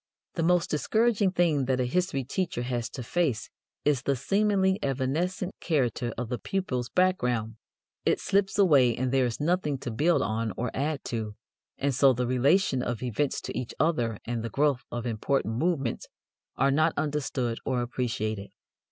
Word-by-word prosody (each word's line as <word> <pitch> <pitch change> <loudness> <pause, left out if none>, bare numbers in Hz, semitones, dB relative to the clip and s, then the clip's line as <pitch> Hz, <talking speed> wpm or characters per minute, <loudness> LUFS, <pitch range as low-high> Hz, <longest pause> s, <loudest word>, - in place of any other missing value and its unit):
The 170 - -2
most 175 +1 +2
discouraging 215 +5 +2
thing 170 -7 +2
that 130 0 0
a 125 - +2
history 175 0 0
teacher 150 -2 -2
has 120 -1 -2
to 125 - -7
face 135 -5 -1 0.3
is 145 -4 +3
the 140 +1 +1
seemingly 195 - +2
evanescent 155 +8 -1
character 125 -6 0
of 120 -1 -3
the 125 - -2
pupils' 130 -11 -2
background. 125 - +1 0.5
It - - +2
slips 195 0 +1
away 140 - +5
and 130 0 -1
there 130 -2 +3
is 115 - -4
nothing 150 -2 0
to 130 -2 -5
build 160 +10 +2
on 110 -1 -1
or 120 -1 -2
add 145 +1 -2
to, 110 -3 -4 0.4
and 140 0 0
so 135 +1 +5
the 125 +1 -1
relation 130 +4 +2
of 120 -1 -3
events 125 +4 -1
to - - -6
each 125 -1 -4
other 120 -9 +1
and 120 -1 -2
the 115 - -4
growth 140 +1 +1
of 120 0 -4
important 115 0 -1
movements 150 -6 -1 0.5
are 135 0 +3
not 155 +3 +2
understood 140 -6 -1
or 125 -2 0
appreciated. 110 -4 -3
135 Hz, 170 wpm, -28 LUFS, 120-165 Hz, 0.5 s, away